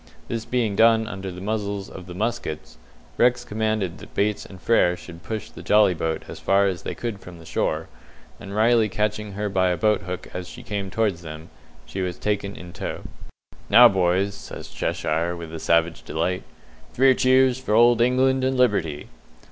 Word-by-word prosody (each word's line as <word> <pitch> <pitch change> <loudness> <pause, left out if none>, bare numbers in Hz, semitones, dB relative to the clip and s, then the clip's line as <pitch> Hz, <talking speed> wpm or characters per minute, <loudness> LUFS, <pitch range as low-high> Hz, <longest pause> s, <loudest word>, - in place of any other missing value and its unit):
This 115 -1 -4
being 115 -5 0
done 115 +1 +5
under 95 -2 -6
the 90 +1 -9
muzzles 100 -1 -3
of 90 -1 -10
the 90 - -8
muskets, 90 - -4 0.4
Rex 120 0 +3
commanded 110 -5 -1
that - - -13
Bates 105 +1 0
and 95 - -12
Frere 90 -5 +3
should 85 -1 -11
push 110 +5 -5
the - - -11
jolly 105 -3 +4
boat 80 -1 -2
as - - -8
far 100 +1 +3
as 95 -3 -1
they - - -5
could 115 -4 -4
from 90 -3 -12
the 80 - -14
shore, - - -1 0.5
and 100 0 -8
Riley 110 0 +4
catching 105 0 -2
her 105 +2 -2
by 95 -2 +2
a 90 - 0
boat 105 +6 +2
hook 90 +1 -6
as 90 -1 -5
she 120 - -10
came 100 -4 -4
towards 100 -4 0
them, 80 0 -9 0.3
she 95 +11 -5
was 90 -1 -3
taken 100 -1 -2
in 90 -1 -10
tow. - - -5 0.7
"Now, 120 +4 +9
boys," 95 +1 +1
says - - -9
Cheshire, 85 +2 -1
with 85 -1 -8
a 80 - -5
savage 85 0 +1
delight, 85 +4 -2 0.5
"three 130 +1 +6
cheers 130 0 +3
for 125 -5 -1
old 120 0 +5
England 130 +2 +3
and 130 0 +1
Liberty!" 90 -12 +1
100 Hz, 190 wpm, -24 LUFS, 90-115 Hz, 0.7 s, Now